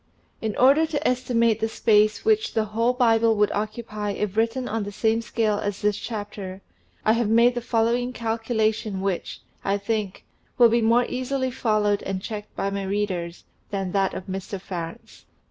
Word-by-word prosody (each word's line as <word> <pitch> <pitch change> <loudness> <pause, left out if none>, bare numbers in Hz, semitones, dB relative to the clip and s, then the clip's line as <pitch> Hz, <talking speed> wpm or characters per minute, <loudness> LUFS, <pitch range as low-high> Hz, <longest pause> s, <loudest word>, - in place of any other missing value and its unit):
In 220 -2 -2
order 280 +5 +5
to 300 -2 -1
estimate 235 -3 +2
the 225 0 0
space 215 - +2
which 435 0 +2
the 220 -1 +2
whole 230 +3 +1
Bible 230 -2 +3
would 210 0 +2
occupy 210 -1 -3
if 205 -1 -3
written 230 +3 0
on 225 +1 -2
the 205 0 -4
same 220 +2 +1
scale 215 -2 0
as 205 -1 -4
this 210 -1 +2
chapter, 205 -3 -6 0.4
I 220 - +5
have 230 -2 +1
made 235 +2 +5
the 240 - -3
following 235 +1 +1
calculation 225 -3 -1
which, 195 -2 -3 0.2
I 200 +1 +1
think, 205 -1 -3 0.3
will 240 -2 +7
be 235 +1 +2
more 230 +2 +4
easily 260 +1 -2
followed 215 -4 +1
and 190 -1 -3
checked 210 +1 -7
by 195 - -1
my 200 0 -2
readers, 190 -4 -2 0.3
than 195 -2 -3
that 195 -1 +1
of 185 - -6
Mr. 190 +1 -5
Farrants. 170 -3 -8
220 Hz, 175 wpm, -24 LUFS, 205-235 Hz, 0.4 s, will